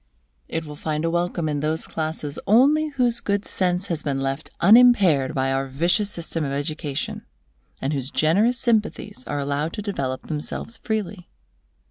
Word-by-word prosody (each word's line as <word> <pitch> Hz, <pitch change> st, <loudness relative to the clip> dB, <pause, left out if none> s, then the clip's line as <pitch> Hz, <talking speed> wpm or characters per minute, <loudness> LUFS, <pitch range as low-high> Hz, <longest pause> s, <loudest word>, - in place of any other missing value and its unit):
It 165 Hz, 0 st, -3 dB
will 150 Hz, -1 st, -8 dB
find 155 Hz, +1 st, -2 dB
a 165 Hz, -, +1 dB
welcome 175 Hz, -1 st, -1 dB
in 150 Hz, -1 st, -1 dB
those 155 Hz, +2 st, -1 dB
classes 155 Hz, -2 st, -4 dB
only 285 Hz, +8 st, +5 dB
whose 250 Hz, -5 st, +1 dB
good 200 Hz, 0 st, -1 dB
sense 180 Hz, 0 st, 0 dB
has 165 Hz, -5 st, -2 dB
been 140 Hz, -2 st, -2 dB
left 135 Hz, +3 st, -3 dB
unimpaired 195 Hz, -, +5 dB
by 135 Hz, 0 st, +1 dB
our 135 Hz, 0 st, 0 dB
vicious 175 Hz, +9 st, +1 dB
system 170 Hz, -3 st, -2 dB
of 140 Hz, -, -2 dB
education, 145 Hz, 0 st, -3 dB, 0.6 s
and 135 Hz, +3 st, -2 dB
whose 135 Hz, -2 st, -2 dB
generous 200 Hz, +13 st, +2 dB
sympathies 220 Hz, -, 0 dB
are 145 Hz, -, -2 dB
allowed 145 Hz, +3 st, -2 dB
to 210 Hz, -, -5 dB
develop 135 Hz, -11 st, -3 dB
themselves 155 Hz, +8 st, -4 dB
freely. 210 Hz, -4 st, -4 dB
160 Hz, 160 wpm, -23 LUFS, 145-205 Hz, 0.6 s, only